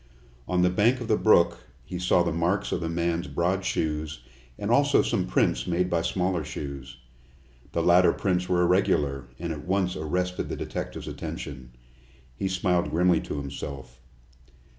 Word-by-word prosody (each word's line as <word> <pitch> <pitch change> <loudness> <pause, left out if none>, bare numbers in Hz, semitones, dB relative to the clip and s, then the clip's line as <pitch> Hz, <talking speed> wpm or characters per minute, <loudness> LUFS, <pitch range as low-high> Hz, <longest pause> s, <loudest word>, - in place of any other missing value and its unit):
On 90 -1 +2
the 90 - +3
bank 115 +7 +3
of 120 - -5
the 110 - +3
brook 85 -6 +4 0.3
he 90 +4 -5
saw 90 -1 +3
the 85 - -1
marks 90 +5 0
of - - -1
the 80 - -2
man's 85 +1 -1
broad 95 +3 0
shoes 80 -4 -2 0.4
and - - -2
also - - +4
some - - 0
prints - - +1
made 90 +1 0
by 85 -1 +2
smaller 90 -1 0
shoes. 70 -4 -7 0.8
The 85 - 0
latter 90 +1 +6
prints 90 -2 -1
were 90 -1 +3
irregular, 75 -7 +2
and 85 +1 -3
at 75 +1 -9
once 95 -1 +1
arrested 90 +4 -2
the - - -3
detective's - - -5
attention. 65 -1 -7 0.6
He 95 - -2
smiled 90 -2 +1
grimly 90 +1 +3
to - - -5
himself. 70 -3 -7
85 Hz, 160 wpm, -26 LUFS, 75-90 Hz, 0.8 s, latter